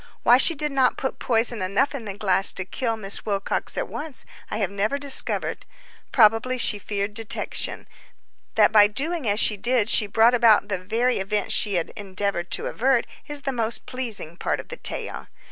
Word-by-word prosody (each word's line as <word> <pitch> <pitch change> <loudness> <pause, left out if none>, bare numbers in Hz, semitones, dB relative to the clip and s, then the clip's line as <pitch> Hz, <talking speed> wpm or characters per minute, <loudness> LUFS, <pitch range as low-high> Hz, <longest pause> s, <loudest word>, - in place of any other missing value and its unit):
Why 245 - +6
she 325 +5 +4
did 300 0 -2
not 265 -2 +2
put 265 - -4
poison 230 -2 0
enough 195 +11 0
in 260 -5 -6
the 200 -1 -6
glass 195 -2 +2
to 190 - -4
kill 225 +3 -3
Miss 200 -2 -1
Wilcox 200 -2 -2
at - - -2
once 300 -3 -8 0.2
I - - -3
have 200 -4 -2
never 210 +7 -1
discovered. 280 -1 +1 0.5
Probably 225 +2 +3
she 215 -3 +2
feared 200 +1 -4
detection. 225 0 -2 0.7
That 215 -1 +4
by 210 -1 +7
doing 285 +4 -2
as 205 +1 +1
she 210 - +3
did 235 +1 +1
she 210 - +5
brought 225 +4 +3
about 225 -4 +4
the 195 -2 -2
very 225 +6 -1
event 200 +1 -2
she 205 -3 +3
had 170 -2 -2
endeavored 195 -3 -3
to - - +1
avert, 255 0 +1 0.2
is 295 -1 -6
the 270 - -2
most 230 -1 -1
pleasing 225 -10 -6
part - - -2
of - - -10
the - - -7
tale. - - -5
220 Hz, 190 wpm, -23 LUFS, 200-255 Hz, 0.7 s, by